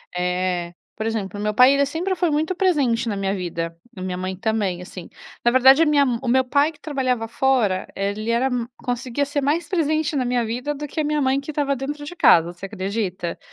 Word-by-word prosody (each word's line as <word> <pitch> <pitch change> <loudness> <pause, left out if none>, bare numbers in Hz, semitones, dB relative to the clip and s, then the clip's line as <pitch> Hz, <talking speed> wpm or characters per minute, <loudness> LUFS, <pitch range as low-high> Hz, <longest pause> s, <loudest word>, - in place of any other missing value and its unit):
Eh, 180 -1 -1 0.2
por 220 - -4
exemplo, 205 -3 -3
meu 210 +1 -1
pai 250 +4 +6
ele 280 0 +3
sempre 340 +7 -2
foi 350 -1 +1
muito 310 +4 0
presente 270 -11 +1
na 205 - -2
minha 195 0 -1
vida, 170 -3 -4 0.2
a - - -6
minha 185 -1 -3
mãe 185 +1 -3
também, 200 -3 -1
assim. 180 -1 -9 0.3
Na 240 - +5
verdade, 265 +4 +6
a - - +5
minha 295 -2 +4
m 240 -3 -1
o 260 - -5
meu 260 +2 +4
pai 285 +4 +2
que 300 - -22
trabalhava 255 -7 -1
fora, 230 -6 +1
ele 205 +3 -2
era 235 +3 +2 0.3
conseguia 250 +3 -2
ser 285 +1 -2
mais 300 +5 0
presente 310 -3 0
na 260 -3 0
minha 245 -1 0
vida 250 +6 -3
do 295 +1 -5
que 305 - -5
a - - +2
minha 300 0 0
mãe 265 0 +2
que 280 +2 -6
estava 285 -2 0
dentro 290 +3 -5
de 355 - -8
casa, 170 - +5
você 175 +3 -9
acredita? 190 -3 -3
245 Hz, 220 wpm, -22 LUFS, 195-290 Hz, 0.3 s, pai